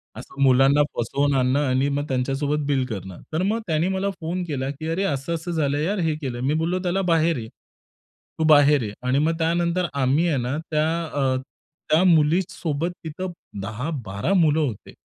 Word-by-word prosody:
असं 140 - -9
मुलांना 135 +2 +5 0.2
फसवून 140 +5 0
आणणे 130 +1 +2
आणि 130 +2 +2
मग 145 +1 -1
त्यांच्यासोबत 140 +3 -1
बिल 135 -3 +1
करणे 95 -6 -6 0.2
तर 160 - 0
मग 215 +4 +1
त्यांनी 160 +1 +1
मला 190 +1 -1
फोन 175 +3 -3
केला, 135 -3 -2
की 145 +3 -6
"अरे, 165 +4 -1
असं-असं 165 +1 -2
झालं 145 -4 0
यार," 190 +7 -1
हे 160 -3 0
केलं, 125 -4 -4
मी 135 +3 +1
बोललो 165 +4 0
त्याला 185 +2 0
"बाहेर 165 -2 +2
ये. 110 -2 -6 0.9
तू - - +2
बाहेर 145 -2 +6
ये." 105 -1 -5
आणि 130 +2 +2
मग 160 +2 +1
त्यानंतर 170 +2 +1
आम्ही 140 +5 +2
आहे 150 - +1
ना 125 +5 -2
त्या 155 0 +2 0.3
अ, 135 -2 +1 0.5
त्या 160 +4 +4
मुलीसोबत 165 -1 +2
तिथे 160 +4 -5 0.3
10-12 140 - 0
होते, 125 -10 -3
150 Hz, 170 wpm, -23 LUFS, 135-165 Hz, 0.9 s, बाहेर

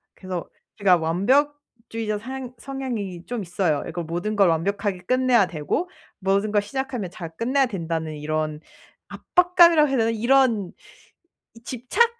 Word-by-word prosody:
그래서 185 -2 -5 0.3
제가 195 -4 +5
완벽주의자 225 - -1
상 255 +2 -7
성향이 230 -10 -5
좀 240 -2 -4
있어요. 175 -4 0
이걸 170 0 -4
모든 175 +6 -3
걸 195 -3 +5
완벽하게 195 +3 -1
끝내야 255 -3 +3
되고 175 - -2 0.3
'모든 200 +2 +1
걸 205 -1 +3
시작하면 250 -2 -4
잘 175 -5 -8
끝내야 265 +4 +2
된다.'는 165 -5 -3
이런 155 0 -2 0.5
압박감이라고 345 -4 +4
해야 270 - +1
되나? 225 -1 +2
이런 230 -4 +2 0.8
이 230 - -16
집착 265 - +1
215 Hz, 310 characters per minute, -24 LUFS, 180-260 Hz, 0.8 s, 제가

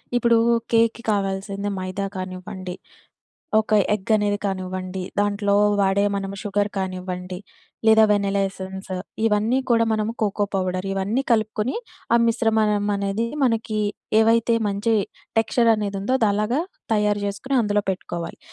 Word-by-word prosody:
ఇప్పుడూ, 235 -1 +4 0.3
కేక్‌కి 230 +1 +2
కావాల్సింది 200 0 -2
మైదా 185 +2 -3
కానివ్వండి, 185 0 -6 0.8
ఒక 220 - -1 0.2
ఎగ్గనేది 205 0 +1
కానివ్వండి, 185 -1 -3 0.2
దాంట్లో 205 0 +1 0.3
వాడే 195 +1 +3
మనము 195 0 -4
షుగర్ 205 -1 0
కానివ్వండి, 185 -1 -4 0.5
లేదా 220 0 +7
వెనెలా 200 -1 +2
ఎసెన్సు, 190 0 -7 0.3
ఇవన్నీ 220 +4 +2
కూడా 230 -1 +4
మనము 215 +1 0
కోకో 205 0 +1
పౌడర్ 185 0 -1
ఇవన్నీ 195 +7 0
కలుపుకుని, 220 +1 +1 0.4
ఆ - - +7
మిశ్రమమనేది 210 -2 +1 0.2
మనకీ, 225 -3 +1 0.4
ఏవైతే 230 +1 +4
మంచి 205 +3 0 0.5
టెక్స్చర‌నేదుందో 220 -1 +1
అదలగా 215 +5 +1 0.3
తయారు 210 -1 +2
జేసుకుని, 200 +7 -3
అందులో 205 -1 +1
పెట్టుకోవాలి. 175 -2 -5
205 Hz, 110 wpm, -23 LUFS, 195-220 Hz, 0.8 s, లేదా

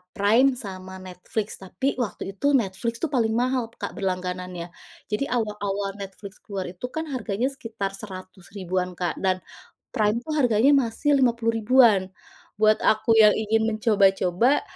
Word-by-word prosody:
Prime, 225 +7 +4
sama 185 -1 -8
Netflix. 195 +4 -4
Tapi, 190 +8 -3
waktu 225 - -3
itu, 195 +8 -7 0.2
Netflix 195 +4 -3
tuh 310 - 0
paling 225 -2 +2
mahal 255 -1 +1 0.2
Kak - - -4
berlangganannya. 180 -2 -3 0.4
Jadi, 210 - 0
awal-awal 205 -3 -2
Netflix 195 0 -9
keluar 195 -2 -5
itu 185 +6 -7
kan 320 - -2
harganya 230 -1 -2
sekitar 225 -6 -5
100 185 -2 -10
ribuan 185 -1 -1
Kak, 175 -1 -2
dan 185 -1 +2 0.6
Prime 210 0 +2
tuh 310 - -3
harganya 245 +1 +4
masih 235 +6 0
50 235 -3 +2
ribuan. 220 -5 +4 0.5
Buat 215 0 +5
aku 220 +1 +3
yang 210 -1 +7
ingin 220 +1 +1
mencoba-coba, 210 +1 +2
210 Hz, 140 wpm, -24 LUFS, 190-230 Hz, 0.6 s, yang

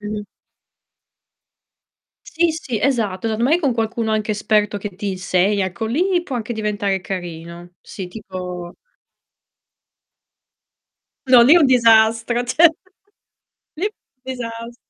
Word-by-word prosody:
Mh-mh. 210 0 -5 2.0
Sì, 335 0 +1
sì, 260 -8 -4
esatto. 225 -7 0
Allor 220 0 -2
mai 300 +8 +3
con 280 -7 +1
qualcuno 225 0 -2
anche 215 0 -1
esperto 210 0 0
che 200 -1 -7
ti 205 +1 -4
insegna, 190 +1 0
ecco 220 +5 -4
lì 350 - 0
può 275 - -5
anche 230 +1 -4
diventare 205 -3 -2
carino. 175 -1 -7
Sì, 190 -3 -8
tipo 180 -3 -7 2.5
No, 255 -2 +7
lì 255 +6 +7
è - - +7
un 315 - +5
disastro, 230 -1 +4
cioè 280 +8 +4 1.1
lì 330 - -3
è - - -2
un 260 - -58
disas 235 -2 -7
220 Hz, 125 wpm, -20 LUFS, 195-245 Hz, 2.5 s, No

